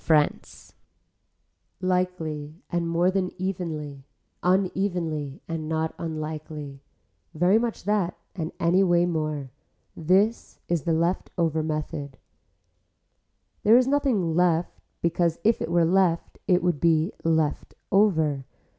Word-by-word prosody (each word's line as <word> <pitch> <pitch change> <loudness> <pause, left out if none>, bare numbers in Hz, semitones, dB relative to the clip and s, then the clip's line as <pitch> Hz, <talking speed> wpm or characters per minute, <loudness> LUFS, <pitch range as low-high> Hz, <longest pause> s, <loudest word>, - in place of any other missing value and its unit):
FRANCE 150 -2 0 1.1
Likely 180 -5 -2 0.2
and 170 -1 0
more 170 +2 +2
than 190 -1 0
evenly, 160 -7 -4 0.4
unevenly 180 -6 0
and 160 -2 -4
not 160 0 -1
unlikely, 155 -3 -5 0.5
very 180 +7 +4
much 235 -1 -3
that 200 -3 0 0.2
and 160 -3 -3
anyway 175 0 +3
more, 155 -5 -2 0.4
this 195 +8 +1
is 170 -4 -1
the 165 - +2
left 170 +3 0
over 160 -2 +1
method. 150 -3 -4 1.4
There 220 +3 +6
is 255 - +4
nothing 260 - +1
left 175 -1 +1 0.2
because 170 -1 +1
if 225 +1 +3
it - - -2
were 170 -1 +3
left 175 -1 +1
it 180 -3 +3
would 175 -5 +1
be 165 +3 +3
left 160 -2 0 0.2
over. 160 -9 +3
170 Hz, 115 wpm, -25 LUFS, 155-185 Hz, 1.4 s, There